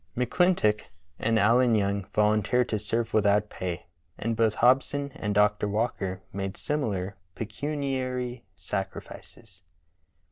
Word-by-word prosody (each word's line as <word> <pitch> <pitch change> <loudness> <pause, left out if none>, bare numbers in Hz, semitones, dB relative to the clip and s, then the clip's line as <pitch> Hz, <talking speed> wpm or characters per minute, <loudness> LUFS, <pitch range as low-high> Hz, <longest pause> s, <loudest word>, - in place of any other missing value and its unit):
McClintock 125 -5 +2 0.4
and 115 0 +2
Allen 115 +3 +4
Young 100 -1 0
volunteered 105 +3 +3
to 110 - 0
serve 115 +2 -2
without 105 0 +3
pay, 90 -1 -4 0.3
and 115 +1 -1
both 110 -1 +2
Hobson 135 +3 +2
and 105 -2 -3
Dr. 105 0 +3
Walker 100 -3 -2
made 95 0 -4
similar 100 -10 -2 0.2
pecuniary 130 0 -3
sacrifices. 95 +1 -7
110 Hz, 110 wpm, -27 LUFS, 100-125 Hz, 0.4 s, Allen